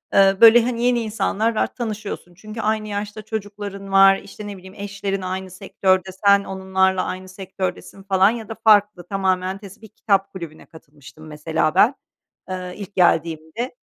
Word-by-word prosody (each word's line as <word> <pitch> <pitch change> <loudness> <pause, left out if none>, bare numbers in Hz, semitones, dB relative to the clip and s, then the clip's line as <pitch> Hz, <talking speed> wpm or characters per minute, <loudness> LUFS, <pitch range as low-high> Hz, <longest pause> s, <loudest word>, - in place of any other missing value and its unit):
ııı, 195 0 +4
böyle, 230 +1 +9
hani, 240 0 -2
yeni 245 -1 +2
insanlar 220 0 -1
var, - - -1
tanışıyorsun. 215 -6 -5
Çünkü 215 +5 -8
aynı 215 0 -1
yaşta 205 +1 -5
çocukların 205 -2 -6
var, 195 0 +6
işte, 205 +1 -10
ne 200 -1 -7
bileyim, 190 +1 -13
eşlerin 200 -1 -4
aynı 185 0 -5
sektörde, 190 0 0 0.2
sen 200 0 +6
onlarla 190 -1 0
aynı 185 0 -6
sektördesin, 190 0 -6
falan, 195 0 +4
ya 225 -2 -5
da 225 - -5
farklı 205 -4 +4
tamamen 190 -1 -1
tes 200 +1 -13
bir 220 - -13
kitap 195 -2 0
kulübüne 170 -4 -9
katılmıştım 150 -1 -15
mesela 155 +1 -1
ben, 230 +8 +5 0.5
eee, 180 -1 -5
ilk 200 -1 -9
geldiğimde. 165 - 0
195 Hz, 160 wpm, -21 LUFS, 185-210 Hz, 0.5 s, böyle